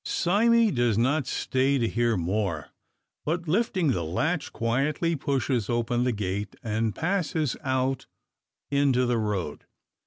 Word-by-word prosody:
Sime 225 +4 +3
does 120 -4 +2
not 130 +4 +1
stay 135 +2 +1
to 120 -3 +1
hear 115 -1 +1
more; 90 -2 -1 0.5
but, 170 +2 -2
lifting 185 - +1
the 90 -8 -1
latch, 145 - -1
quietly 140 +8 0
pushes 130 -5 -1
open 120 +1 0
the 125 - +2
gate, 100 -1 -3
and 110 -1 -1
passes 160 -5 0
out 130 0 -1 0.6
into 140 -3 +3
the 120 -1 +1
road. 100 -8 -3
125 Hz, 130 wpm, -26 LUFS, 110-155 Hz, 0.6 s, Sime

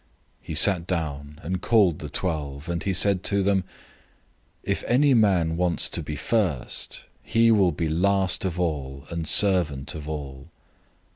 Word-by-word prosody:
009:035 - - -34
He 80 - -4
sat 85 +2 +5
down, 75 -4 -4
and 90 +2 -3
called 100 -9 +2
the 75 - -7
twelve; 75 -5 -3
and 85 -1 -3
he 100 - -2
said 95 0 +3
to 100 -1 +1
them, 95 -1 +1 1.0
"If - - -2
any 140 +3 +3
man 90 -8 +2
wants 90 -1 +1
to - - -4
be 75 - -6
first, 85 - -2 0.2
he 115 0 +2
shall 100 -5 +4
be 80 +1 -3
last 95 +4 +1
of 90 -2 -3
all, 70 -5 -3
and 85 -1 -4
servant 80 -7 +2
of 75 -1 -8
all." 70 -3 -7
85 Hz, 160 wpm, -24 LUFS, 75-95 Hz, 1.0 s, sat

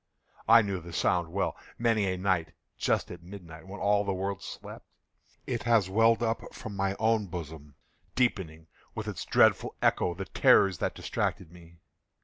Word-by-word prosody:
I 115 0 +8
knew 100 -2 -2
the 85 +1 -10
sound 85 0 +1
well. 95 +1 -1 0.2
Many 115 -3 +2
a 95 - -3
night, 95 -3 0 0.2
just - - 0
at 85 - -9
midnight, 85 -2 -11
when 100 +2 -8
all 100 0 +2
the 100 -1 -2
world 95 0 -3
slept, - - -9 0.6
it 120 -3 -2
has 115 -5 +2
welled 115 +3 +4
up 115 0 -3
from 105 -2 -7
my 100 0 -1
own 110 -2 +1
bosom, 80 -5 -8 0.4
deepening, 90 -10 -1 0.3
with - - -5
its - - -5
dreadful - - +3
echo, 85 - +1
the 95 +2 -5
terrors 95 -3 +4
that - - -1
distracted 85 -3 -3
me. 85 -1 -17
95 Hz, 165 wpm, -29 LUFS, 85-105 Hz, 0.6 s, I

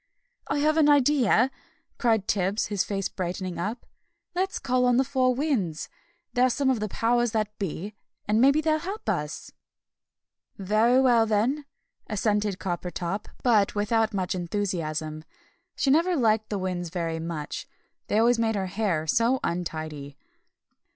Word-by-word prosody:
"I - - -1
have 305 +2 +2
an 300 -2 +5
idea!" 270 -3 +4 0.5
cried 225 -5 +2
Tibbs, 195 +1 0
his 200 - +1
face 195 -1 -2
brightening 185 -1 -4
up. 210 +7 -4 0.5
"Let's 375 +2 -1
call 255 -1 +1
on 245 -1 +3
the 265 - +4
Four 255 -2 +1
Winds. 240 - -1 0.4
They're 255 0 +4
some 265 +2 +1
of 250 - 0
the 215 - -2
Powers 240 +2 +1
that 215 -1 -1
be, 195 +2 -4 0.3
and 215 +2 +3
maybe 280 +4 +5
they'll 310 0 +1
help 390 +6 -6
us." - - -3 1.1
"Very 215 +6 +3
well, 240 -4 +4
then," 240 +8 +1 0.4
assented 210 -2 0
Coppertop, 180 +2 -4 0.2
but 215 -6 +3
without 220 +2 +1
much 190 -3 -2
enthusiasm; 165 -4 -3 0.5
she 270 - +1
never 340 +5 +3
liked 220 -5 +2
the 205 - -2
Winds 180 -2 -3
very 165 -2 -3
much, 160 -2 -5 0.4
they 210 - +1
always 235 +1 +4
made 225 -1 +1
her 195 -2 -1
hair 185 -5 -1
so 230 - +2
untidy. 155 -5 -4
215 Hz, 145 wpm, -26 LUFS, 185-250 Hz, 1.1 s, an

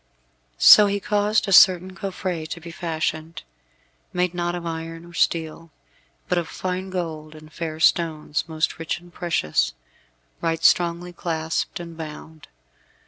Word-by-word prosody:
So 210 -1 +9
he 200 0 -1
caused 210 +1 +1
a 195 - +1
certain 185 0 +6
coffret 185 -5 -4
to 170 - -5
be 170 0 -10
fashioned, 160 -1 -3 0.7
made 180 0 0
not 175 0 -2
of 175 -1 -6
iron 165 0 -6
or 175 - -14
steel, 165 -1 -1 0.6
but 180 - +1
of 170 - -4
fine 185 +2 -4
gold 160 -4 -5
and 155 0 -14
fair 160 -1 -5
stones, 160 -2 +1
most 160 0 -2
rich 165 +1 -3
and 175 0 -18
precious, 75 - 0 0.7
right 165 -1 -1
strongly 175 +1 +2
clasped 160 -1 -3
and 170 -1 -8
bound. 160 -1 -9
170 Hz, 140 wpm, -23 LUFS, 160-180 Hz, 0.7 s, So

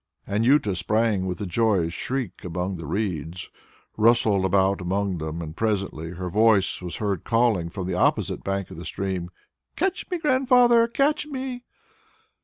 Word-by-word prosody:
Anjuta 105 0 +2
sprang 105 0 +1
with 90 +1 -4
a - - -2
joyous 95 -3 +1
shriek 130 -4 -4
among 90 +2 -3
the 80 -3 -7
reeds, 85 -2 -3 0.5
rustled 110 -3 +3
about 95 +1 +2
among 95 0 -1
them, 80 +2 -4
and 80 0 -8
presently 100 -7 -2
her 90 +1 -5
voice 105 0 +3
was 90 -1 -6
heard 100 -5 -2
calling 115 -7 +2
from 95 +1 -5
the 95 - -2
opposite 90 - +1
bank 100 -1 -3
of - - -9
the - - -7
stream, 95 -3 -3 0.5
"Catch 380 +2 -1
me, 360 - -1
Grandfather! 250 -5 +4
Catch 290 +5 +1
me!" 260 -3 -5
100 Hz, 155 wpm, -24 LUFS, 90-120 Hz, 0.5 s, Grandfather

